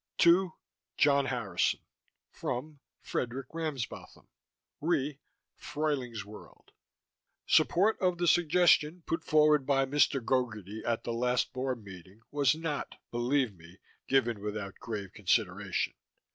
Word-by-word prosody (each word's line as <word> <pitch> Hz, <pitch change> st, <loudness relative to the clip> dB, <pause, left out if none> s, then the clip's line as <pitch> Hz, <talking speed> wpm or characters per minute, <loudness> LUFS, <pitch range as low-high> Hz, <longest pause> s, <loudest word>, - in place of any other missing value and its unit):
TO: 175 Hz, 0 st, +5 dB, 0.4 s
John 140 Hz, -1 st, +4 dB
Harrison 115 Hz, -9 st, 0 dB, 0.5 s
FROM: 145 Hz, +4 st, -5 dB, 0.3 s
Fredk. 130 Hz, +2 st, -2 dB
Ramsbotham 155 Hz, -7 st, -5 dB, 0.6 s
RE: 150 Hz, -3 st, 0 dB, 0.4 s
Fruyling's 130 Hz, -9 st, -3 dB
World... 105 Hz, +1 st, -14 dB, 0.7 s
Support 205 Hz, +5 st, +3 dB
of 180 Hz, -2 st, +2 dB
the 175 Hz, -, 0 dB
suggestion 175 Hz, -1 st, +4 dB
put 165 Hz, 0 st, -2 dB
forward 150 Hz, -2 st, +4 dB
by 135 Hz, -1 st, +3 dB
Mr. 140 Hz, 0 st, +3 dB
Gogarty 110 Hz, -5 st, -2 dB
at 115 Hz, -1 st, -1 dB
the 120 Hz, -, -3 dB
last 125 Hz, +1 st, 0 dB
Board 130 Hz, -3 st, -3 dB
meeting 95 Hz, +2 st, -12 dB
was 145 Hz, 0 st, +3 dB
not, 160 Hz, -3 st, -4 dB, 0.2 s
believe 120 Hz, 0 st, +1 dB
me, 85 Hz, +1 st, -16 dB, 0.3 s
given 120 Hz, -6 st, +2 dB
without 105 Hz, -2 st, -5 dB
grave 105 Hz, -5 st, -5 dB
consideration. 100 Hz, -2 st, 0 dB
130 Hz, 115 wpm, -30 LUFS, 110-150 Hz, 0.7 s, TO